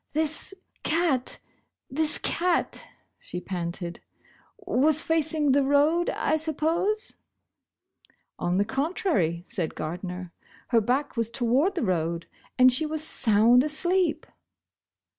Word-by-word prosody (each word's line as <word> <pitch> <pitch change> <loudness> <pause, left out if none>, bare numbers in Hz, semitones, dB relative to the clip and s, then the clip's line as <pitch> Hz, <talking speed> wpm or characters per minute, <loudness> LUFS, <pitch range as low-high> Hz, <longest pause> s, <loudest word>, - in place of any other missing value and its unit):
"This 315 +5 -2 0.3
cat 310 -6 0 0.3
— - - -55
this 305 +2 +1
cat," 350 0 -1 0.3
she 180 - -7
panted, 175 -1 -5 0.6
"was 315 -6 +2
facing 315 -2 +1
the 280 +2 +4
road, 290 +5 +3
I - - 0
suppose? 330 +8 -1 0.6
" - - -60 0.5
"On 175 +1 0
the 200 - +2
contrary," 245 - -1
said 170 -4 -3
Gardner, 180 +2 -6 0.2
" - - -26
her 230 -2 +4
back 260 +6 -1
was 230 -2 0
toward 260 +10 +1
the 345 - -1
road, 170 -3 -1 0.3
and 255 0 +6
she 310 +4 0
was 310 0 -2
sound 235 -3 +4
asleep." 345 +3 +1
275 Hz, 120 wpm, -26 LUFS, 205-320 Hz, 0.6 s, and